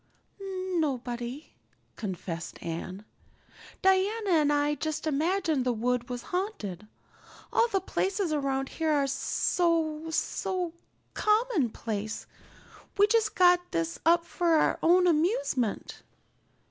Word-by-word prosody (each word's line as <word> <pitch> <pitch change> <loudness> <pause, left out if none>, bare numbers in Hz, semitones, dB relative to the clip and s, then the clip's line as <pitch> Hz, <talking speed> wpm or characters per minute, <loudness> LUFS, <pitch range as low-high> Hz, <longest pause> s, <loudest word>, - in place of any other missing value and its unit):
"Nobody," 300 -9 -3 0.4
confessed 180 -5 -5
Anne. 185 +5 -5 0.8
"Diana 385 +2 +2
and 305 -3 +4
I 290 0 +2
just 310 +1 -3
imagined 315 -1 +1
the 250 - +1
wood 240 +2 -1
was 245 -1 -4
haunted. 220 - -3 0.7
All 460 - +4
the 395 -4 0
places 380 -2 -1
around 270 -2 -1
here 320 -1 -1
are 285 -2 +3
so 320 +3 0
so 355 +2 -2 0.4
commonplace. 250 - 0 0.7
We 405 - +7
just 435 0 +1
got 360 -1 +6
this 165 0 -2
up 335 +1 +4
for 340 -2 +1
our 310 - +2
own 360 +2 +5
amusement. 330 - 0
315 Hz, 110 wpm, -28 LUFS, 250-370 Hz, 0.8 s, We